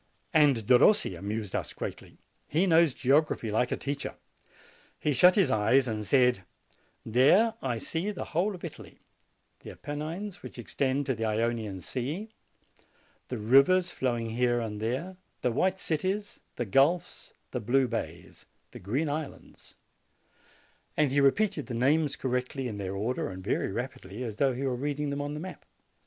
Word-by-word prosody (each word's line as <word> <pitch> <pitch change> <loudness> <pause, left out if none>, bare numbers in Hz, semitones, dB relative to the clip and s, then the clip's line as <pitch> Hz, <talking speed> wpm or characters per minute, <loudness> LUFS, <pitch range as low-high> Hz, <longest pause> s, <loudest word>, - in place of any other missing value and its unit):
And 145 -8 +4
Derossi 125 - +5
amused 105 +2 -4
us - - -3
greatly. - - -7 0.3
He 165 +6 +2
knows 165 -5 +4
geog 145 +4 +3
raphy 110 -6 -4
like 120 +3 +1
a - - 0
teacher. 140 0 -4 0.8
He 150 - 0
shut 180 +8 +6
his 185 -10 +3
eyes 125 +4 +3
and 110 -2 -3
said: 125 -7 +3 0.6
'There, 150 - +4
I 125 -3 -1
see 165 - -2
the 205 - -4
whole 190 +5 +1
of 175 - -13
Italy; 165 - -10 0.6
the - - -11
Apennines, 160 +7 -6
which 125 - -10
extend 135 +3 -1
to 130 - 0
the 115 -1 -3
Ionian 110 -3 -1
Sea, 145 - -4 1.0
the 125 - -4
rivers 140 +12 +4
flowing 120 -3 -2
here 120 +1 +1
and 105 -2 -4
there, 135 +12 -3 0.3
the 125 - +2
white 185 +10 +1
cities, 190 +7 -2 0.2
the 120 - -2
gulfs, 140 - +1 0.2
the - - -2
blue 130 +4 +2
bays, - - -6 0.2
the - - -10
green 130 - -1
islands"; 150 0 -7 1.2
and 150 -3 +3
he 140 +1 +3
repeated 165 +3 +2
the 125 - -4
names 145 +4 +2
correctly 130 0 -2
in 105 -4 -5
their 95 -1 -4
order 110 +4 -2
and 95 0 -8
very 100 -1 -1
rapidly, 115 -1 -5
as 110 -4 -5
though 135 -1 +2
he 130 - -4
were 135 -2 0
read 145 +3 -3
ing 145 -1 -1
them 140 0 -2
on 145 +1 -4
the - - -5
map. 185 +3 -8
135 Hz, 165 wpm, -29 LUFS, 115-155 Hz, 1.2 s, shut